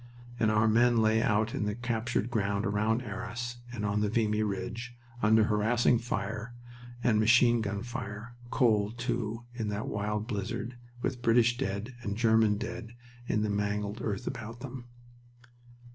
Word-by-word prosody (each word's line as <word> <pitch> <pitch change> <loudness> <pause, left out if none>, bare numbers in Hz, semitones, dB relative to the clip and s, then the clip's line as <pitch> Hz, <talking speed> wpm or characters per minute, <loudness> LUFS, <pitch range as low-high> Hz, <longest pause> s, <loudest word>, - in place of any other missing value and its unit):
And 110 - +3
our 110 0 +3
men 120 +2 +4
lay 110 0 +4
out 110 +1 +1
in 105 - -1
the 105 0 -1
captured 120 -1 -1
ground 100 -3 0
beyond 110 +3 +1
Arras 115 +2 -5
and 110 -3 -3
on 105 0 +1
the 105 - +1
Vimy 110 -1 +1
Ridge, 115 +4 -3 0.3
under 110 +1 +5
harassing 115 +3 +3
fire 115 0 -4 0.5
and 110 -3 +3
machine 115 +1 +5
gun 100 0 -3
fire, 115 0 -6
cold, 110 -4 +2
too, 115 -1 -2
in 115 -3 -3
that 105 +1 -3
wild 105 +1 -2
blizzard, 115 +2 -3 0.3
with 125 -2 -2
British 120 +1 +4
dead 110 -1 -3
and 100 -3 -3
German 110 -2 +4
dead 115 +2 -6 0.3
in 105 - +1
the 105 - 0
mangled 105 +1 -1
earth 100 -3 -2
about 115 -2 -6
them. 130 -2 -7
110 Hz, 155 wpm, -30 LUFS, 105-120 Hz, 0.5 s, under